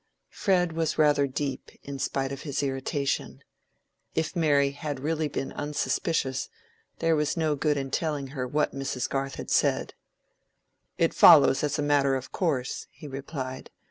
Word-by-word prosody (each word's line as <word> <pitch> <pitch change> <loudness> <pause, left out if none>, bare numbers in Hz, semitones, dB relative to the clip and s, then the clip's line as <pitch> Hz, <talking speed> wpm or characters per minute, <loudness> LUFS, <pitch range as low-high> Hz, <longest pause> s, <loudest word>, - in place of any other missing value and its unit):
Fred 180 -3 +1
was 160 -1 -1
rather 145 -2 +4
deep, 135 0 -4
in 140 -1 -6
spite 135 0 -1
of 140 0 -6
his 145 -2 -2
irritation. 135 +1 -2 0.7
If 160 - -1
Mary 145 -4 +3
had 145 -1 -5
really 155 +2 -1
been 135 -1 -4
unsuspicious, 145 -1 -1 0.5
there 165 -1 +2
was 150 +2 0
no 155 -2 +1
good 150 +1 +1
in 135 -1 -3
telling 145 -4 -1
her 130 -2 -4
what 150 +4 0
Mrs. 135 -2 -2
Garth 135 0 -2
had - - -7
said. - - +2 1.0
"It - - +2
follows 135 - +7
as 150 0 0
a 150 - 0
matter 140 -2 +3
of 130 -1 -5
course," 140 -8 -1
he 150 - -12
replied. 135 -1 -6
145 Hz, 155 wpm, -27 LUFS, 135-155 Hz, 1.0 s, follows